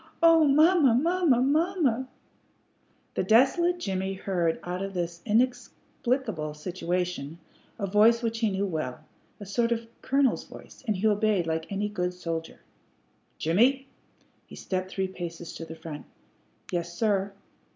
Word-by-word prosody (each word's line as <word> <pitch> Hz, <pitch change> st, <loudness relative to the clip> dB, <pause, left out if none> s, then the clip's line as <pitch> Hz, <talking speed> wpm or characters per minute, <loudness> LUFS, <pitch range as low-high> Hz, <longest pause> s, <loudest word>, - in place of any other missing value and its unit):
"Oh, 330 Hz, -1 st, +7 dB
mamma! 300 Hz, -2 st, +5 dB
mamma! 325 Hz, -2 st, +3 dB
mamma!" 290 Hz, -4 st, +1 dB, 1.1 s
The -, -, 0 dB
desolate 270 Hz, -, +4 dB
Jimmie 190 Hz, -, -2 dB
heard 175 Hz, -4 st, -1 dB
out 180 Hz, +1 st, -4 dB
of 195 Hz, 0 st, -5 dB
this 170 Hz, -1 st, -3 dB
inexplicable 240 Hz, -, -1 dB
situation 175 Hz, -2 st, -3 dB, 0.4 s
a 200 Hz, -, -2 dB
voice 220 Hz, +4 st, +4 dB
which 225 Hz, 0 st, -1 dB
he 225 Hz, -2 st, +2 dB
knew 195 Hz, 0 st, -1 dB
well, 155 Hz, -5 st, -4 dB, 0.3 s
a 205 Hz, -, -8 dB
sort 230 Hz, +4 st, 0 dB
of 230 Hz, 0 st, -1 dB, 0.2 s
colonel's 270 Hz, -2 st, +1 dB
voice, -, -, -14 dB
and 215 Hz, -, +1 dB
he 195 Hz, -, -2 dB
obeyed 210 Hz, -3 st, +2 dB
like 160 Hz, +1 st, -3 dB
any 200 Hz, +1 st, -1 dB
good 180 Hz, -3 st, -2 dB
soldier. 165 Hz, -2 st, -5 dB, 0.8 s
"Jimmie!" 245 Hz, -, +2 dB, 0.6 s
He -, -, -11 dB
stepped 185 Hz, 0 st, -3 dB
three 190 Hz, 0 st, -2 dB
paces 170 Hz, -2 st, -7 dB
to 165 Hz, -, -7 dB
the 160 Hz, 0 st, -9 dB
front. 155 Hz, -2 st, -9 dB, 0.6 s
"Yes, 175 Hz, -1 st, -2 dB
sir." 200 Hz, -3 st, +1 dB
200 Hz, 140 wpm, -27 LUFS, 175-250 Hz, 1.1 s, Oh